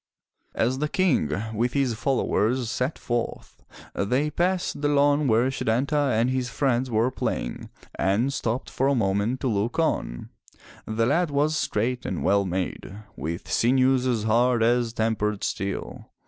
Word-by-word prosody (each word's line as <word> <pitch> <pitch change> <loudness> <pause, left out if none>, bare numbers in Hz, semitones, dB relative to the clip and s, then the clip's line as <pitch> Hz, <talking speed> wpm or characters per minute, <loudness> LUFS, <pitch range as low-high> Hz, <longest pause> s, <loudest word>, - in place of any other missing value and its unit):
As 125 +4 0
the 150 +1 -1
King, 165 - +2 0.2
with 120 +3 0
his 135 -4 +1
followers, 120 0 0
set 130 +5 -2
forth, 120 -1 -4 0.3
they 130 +9 0
passed 180 -1 -1
the 145 - +2
lawn 145 0 +3
where 120 +3 +3
Setanta 135 +4 0
and 115 - +2
his 130 -1 -1
friends 130 +1 0
were 115 +2 +1
playing - - -3 0.3
and 105 +9 +1
stopped 120 0 -2
for 135 - 0
a 140 - +3
moment 105 +3 0
to 135 - 0
look 110 +1 -1
on. 155 - -1 0.6
The 110 +1 0
lad 170 +7 +2
was 145 +2 +1
straight 125 -2 -1
and - - -3
well 100 0 +3
made, 95 +1 -4 0.2
with 85 +3 -5
sinews 130 +1 +3
as 115 -4 0
hard 115 +2 +3
as 120 0 +2
tempered 110 -2 -1
steel. 100 0 -4
125 Hz, 150 wpm, -25 LUFS, 110-135 Hz, 0.6 s, lawn